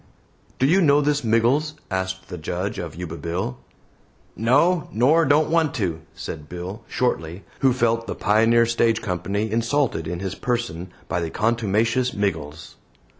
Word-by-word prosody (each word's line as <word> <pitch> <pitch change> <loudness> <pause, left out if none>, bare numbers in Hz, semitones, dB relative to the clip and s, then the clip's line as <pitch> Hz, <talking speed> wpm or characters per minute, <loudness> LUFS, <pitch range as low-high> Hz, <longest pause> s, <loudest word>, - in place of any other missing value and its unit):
"Do 130 - +2
you 180 +7 +4
know 145 -3 +5
this 145 -1 +1
Miggles?" 120 +7 +2 0.2
asked 95 0 -3
the 90 - -6
Judge 90 +5 -3
of 80 -4 -6
Yuba 85 -1 -6
Bill. 95 +10 -3 0.8
"No, 145 - +2
nor, 145 +9 +4
don't 150 +3 +3
want 160 -2 +2
to," 90 - -2
said 75 0 -7
Bill, 90 +5 -6
shortly, 90 -7 -2 0.2
who 135 - +4
felt 115 -2 +1
the - - -3
Pioneer 115 +3 +4
Stage 115 -1 +2
Company 100 +3 -2
insulted 115 - 0
in 85 +1 -4
his 95 0 -3
person 95 -8 -3 0.2
by 90 - -1
the 85 - -2
contumacious 115 +4 +1
Miggles. 80 -6 -3
110 Hz, 150 wpm, -23 LUFS, 90-125 Hz, 0.8 s, know